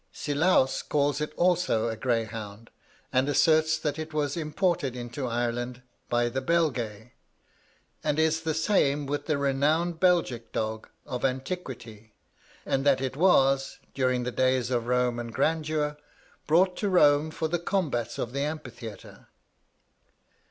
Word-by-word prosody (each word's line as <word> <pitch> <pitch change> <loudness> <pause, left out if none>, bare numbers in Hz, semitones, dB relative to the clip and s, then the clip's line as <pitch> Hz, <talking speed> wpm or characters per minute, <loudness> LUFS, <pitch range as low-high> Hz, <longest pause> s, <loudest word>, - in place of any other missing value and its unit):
Silaus 145 -2 +1
calls 145 0 0
it 150 - -2
also 175 -10 +2
a 115 - -2
greyhound, 110 -2 -3 0.4
and 130 +2 +2
asserts 155 +2 +3
that 150 -1 -3
it 155 0 -6
was 145 -2 0
imported 155 -4 -1
into 125 +2 -5
Ireland 120 +1 -2 0.3
by 120 0 +2
the 130 +3 -2
Belgæ, 125 -9 -1 0.9
and 145 - 0
is 160 0 +2
the 160 -2 -2
same 150 -5 +2
with 145 +1 -3
the 155 -3 +1
renowned 150 +5 +1
Belgic 170 -11 +1
dog 110 0 -3 0.2
of 125 -4 -5
antiquity, 130 - -4 0.5
and 135 - 0
that 140 -2 +4
it 130 0 -3
was, 135 -5 +3 0.2
during 130 -2 +1
the 125 - -2
days 130 -1 +1
of 120 -2 0
Roman 125 -1 0
grandeur, 150 +2 0 0.5
brought 180 +4 +4
to 205 - -1
Rome 150 -4 +4
for 160 0 -2
the 175 +2 -1
combats 150 - -1
of 120 - -4
the 140 - -2
Amphitheatre. 140 -8 -7
140 Hz, 140 wpm, -27 LUFS, 120-160 Hz, 0.9 s, that